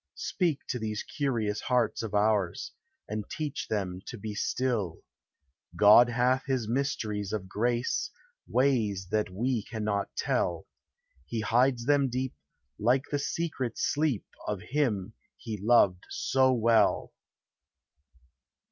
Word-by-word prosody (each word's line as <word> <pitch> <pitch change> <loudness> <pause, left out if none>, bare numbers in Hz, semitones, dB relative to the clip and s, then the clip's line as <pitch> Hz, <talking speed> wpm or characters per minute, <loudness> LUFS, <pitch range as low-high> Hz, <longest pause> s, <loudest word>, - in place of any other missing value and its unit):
Speak 165 -6 -1
to 125 - -1
these 110 -1 -3
curious 115 -8 -1
hearts 125 -3 +1
of 110 -2 -4
ours, 105 -4 +1 0.4
And 105 -1 -4
teach 150 -2 -4
them 95 -4 -2
to 120 - -6
be 105 0 -5
still: 105 -7 -1 0.7
God 105 +4 +7
hath 125 +2 +2
his 130 -5 0
mysteries 110 -6 -1
of 105 -4 -3
grace, 120 +5 0 0.4
Ways 110 -8 +1
that 105 -2 +1
we 115 +5 -1
cannot 105 -2 -2
tell, - - 0 0.6
He 115 -2 -2
hides 120 +2 +2
them 140 -1 +3
deep, 130 +1 -2 0.5
like 125 +5 +3
the 145 - +1
secret 145 -5 -2
sleep 145 -7 0 0.2
Of 105 -3 -2
him 115 -8 0 0.2
he 110 -4 -6
loved 100 -5 +4
so 130 0 +2
well. 115 -2 +3
115 Hz, 120 wpm, -29 LUFS, 105-130 Hz, 0.7 s, God